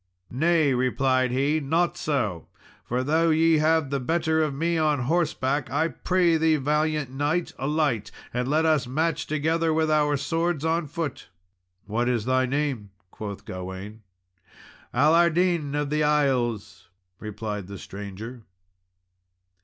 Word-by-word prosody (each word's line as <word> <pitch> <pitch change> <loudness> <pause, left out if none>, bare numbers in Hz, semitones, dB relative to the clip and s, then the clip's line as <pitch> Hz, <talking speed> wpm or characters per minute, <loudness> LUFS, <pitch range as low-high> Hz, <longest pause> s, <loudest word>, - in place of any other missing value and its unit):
"Nay," 155 +1 +2
replied 130 +1 +1
he, 140 +5 +1
"not 160 +5 0
so; 110 - -2 0.4
for 125 +1 -2
though 160 +4 +2
ye 160 0 +4
have 155 -2 +2
the 140 - 0
better 160 +3 +1
of 155 -2 +1
me 165 +5 -1
on 155 -4 +1
horseback, 140 -2 0
I 155 +6 +1
pray 175 -2 +1
thee, 160 0 +3
valiant 150 -1 0
knight, 150 +6 -1
alight, 140 -5 0 0.2
and 125 +1 -1
let 155 +3 +2
us 155 -5 +2
match 160 +4 -1
together 160 +2 0
with 160 0 +1
our 150 -1 +2
swords 165 +1 -1
on 165 0 0
foot." 155 - -5 0.6
"What 120 +3 -1
is 120 -3 0
thy 130 0 +2
name?" 135 -6 -2 0.2
quoth 100 -2 -7
Gawain. 95 +4 -7 0.9
"Allardin 165 +1 +3
of 145 -1 -2
the 150 0 +1
Isles," 130 -11 0 0.3
replied 105 -2 -5
the 100 0 -8
stranger. 105 +6 -8
145 Hz, 135 wpm, -25 LUFS, 125-160 Hz, 0.9 s, ye